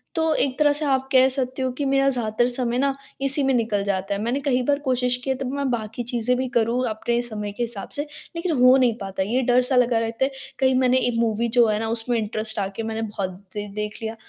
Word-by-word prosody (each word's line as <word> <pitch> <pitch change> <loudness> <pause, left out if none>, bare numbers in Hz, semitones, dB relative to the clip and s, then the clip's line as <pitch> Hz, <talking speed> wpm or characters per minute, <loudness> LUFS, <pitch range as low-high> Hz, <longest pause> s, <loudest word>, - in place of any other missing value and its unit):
तो 320 -1 +2
एक 265 -2 0
तरह 295 -1 +4
से 295 +1 -1
आप 265 -1 +1
कह 260 0 +6
सकते 260 0 -2
हो 260 0 0
कि 285 - -1
मेरा 275 0 +2
ज़्यादातर 240 -2 0
समय 245 -1 -1
न 275 0 +2 0.3
इसी 275 +1 +2
में 270 0 +2
निकल 220 -4 0
जाता 195 0 -1
है। 200 - -3
मैंने 240 +5 -1
कई 265 -2 +1
बार 285 +2 +1
कोशिश 250 -3 +1
की 270 - -4
है 265 - +2
तब 260 -1 -4
मैं 280 -1 -1
बाकी 225 0 -3
चीज़ें 240 +1 0
भी 260 +1 -1
करूँ 235 +2 +1
अपने 235 +2 -1
समय 210 -4 -5
के 240 +4 -3
हिसाब 230 -4 -6
से 290 +1 -3 0.3
लेकिन 335 +1 -1
हो 255 +1 +8
नहीं 250 -3 +3
पाता। 195 -2 -3
ये 235 +7 0
डर-सा 250 +1 +2
लगा 245 -2 +3
रहता 225 +3 0
है 275 - -3 0.3
कहीं 260 -1 +3
मैंने 255 0 +3
एक 245 -2 0
मूवी 230 0 +1
जो 235 -1 +7
है 210 -1 +1
न - - -1
उसमें 235 +1 -1
इंटरेस्ट 215 0 -2
आके 195 +2 -3
मैंने 225 0 -3
बहुत 205 -4 -3 0.3
दि 205 0 -3
देख 210 0 -4
लिया 220 0 -4
245 Hz, 250 wpm, -23 LUFS, 220-265 Hz, 0.3 s, हो